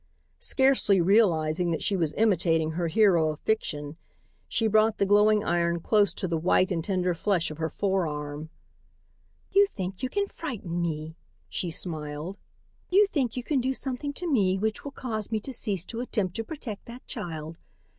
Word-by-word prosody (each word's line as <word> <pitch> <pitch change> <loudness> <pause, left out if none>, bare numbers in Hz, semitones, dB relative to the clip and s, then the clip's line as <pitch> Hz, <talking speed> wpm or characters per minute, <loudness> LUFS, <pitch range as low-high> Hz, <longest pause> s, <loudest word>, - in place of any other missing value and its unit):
Scarcely 265 -8 +3
realizing 175 -4 +3
that 165 - -1
she 200 - +1
was 165 -5 0
imitating 165 -7 +2
her 170 +1 -1
hero 170 -3 +4
of 155 -1 -5
fiction, 150 -8 -2 0.5
she 225 - 0
brought 220 0 +3
the 200 - +2
glowing 210 +1 +4
iron 170 -1 +1
close 205 +3 +3
to 185 - -2
the 165 -2 -1
white 185 +3 +3
and 165 -3 -1
tender 180 -1 0
flesh 175 -2 0
of 155 - -9
her 160 0 -1
forearm. 155 -6 -2 1.0
"You 400 +1 +5
think 185 0 -4
you 255 - -1
can 400 +8 0
frighten 220 - -5
me," 160 -1 -3 0.3
she 180 - -3
smiled. 160 +1 -5 0.5
"You 400 +3 +6
think 255 -6 -1
you 250 - -2
can 275 0 +1
do 260 +2 0
something 270 +2 -3
to 355 - -4
me 195 - +2
which 215 +2 -1
will 285 - -6
cause 220 -6 -4
me 220 - +1
to 270 - -6
cease 200 -7 -1
to 230 - -5
attempt 210 -7 -2
to 225 - -2
protect 225 -7 -7
that 240 +2 -11
child. 165 -6 -6
195 Hz, 175 wpm, -27 LUFS, 165-225 Hz, 1.0 s, You